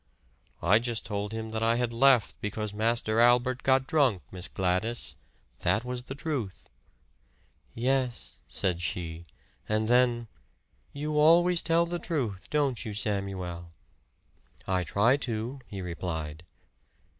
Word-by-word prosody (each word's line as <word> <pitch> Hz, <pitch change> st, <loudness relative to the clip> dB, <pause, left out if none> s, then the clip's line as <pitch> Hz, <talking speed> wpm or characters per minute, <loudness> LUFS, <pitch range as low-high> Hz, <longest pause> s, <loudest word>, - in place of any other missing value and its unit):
"I 105 Hz, -, +5 dB
just 120 Hz, -1 st, -3 dB
told 105 Hz, 0 st, -3 dB
him 110 Hz, 0 st, -5 dB
that 110 Hz, 0 st, -3 dB
I 115 Hz, +1 st, +3 dB
had 120 Hz, -1 st, -1 dB
left 125 Hz, -2 st, +4 dB
because 105 Hz, 0 st, -3 dB
Master 110 Hz, +1 st, 0 dB
Albert 125 Hz, +2 st, +4 dB
got 130 Hz, 0 st, +3 dB
drunk, 135 Hz, -, +2 dB
Miss 90 Hz, -1 st, -5 dB
Gladys. 95 Hz, +6 st, -1 dB, 0.4 s
That 105 Hz, +7 st, +1 dB
was 125 Hz, 0 st, -4 dB
the 135 Hz, -, -6 dB
truth." 140 Hz, -, -4 dB, 1.0 s
"Yes," 125 Hz, 0 st, -1 dB
said 90 Hz, -2 st, 0 dB
she; 85 Hz, -1 st, -4 dB, 0.4 s
and 110 Hz, 0 st, +1 dB
then, 120 Hz, -1 st, +3 dB, 0.6 s
"You 150 Hz, +1 st, -2 dB
always 170 Hz, +3 st, +5 dB
tell 170 Hz, 0 st, +3 dB
the 175 Hz, 0 st, -3 dB
truth, 120 Hz, -, -3 dB
don't 140 Hz, -5 st, 0 dB
you, 110 Hz, -4 st, -5 dB
Samuel?" 95 Hz, -5 st, -3 dB, 0.9 s
"I 95 Hz, -1 st, +1 dB
try 105 Hz, -, +3 dB
to," 120 Hz, 0 st, -3 dB
he 95 Hz, -2 st, -6 dB
replied. 80 Hz, -2 st, -5 dB
115 Hz, 130 wpm, -28 LUFS, 95-130 Hz, 1.0 s, I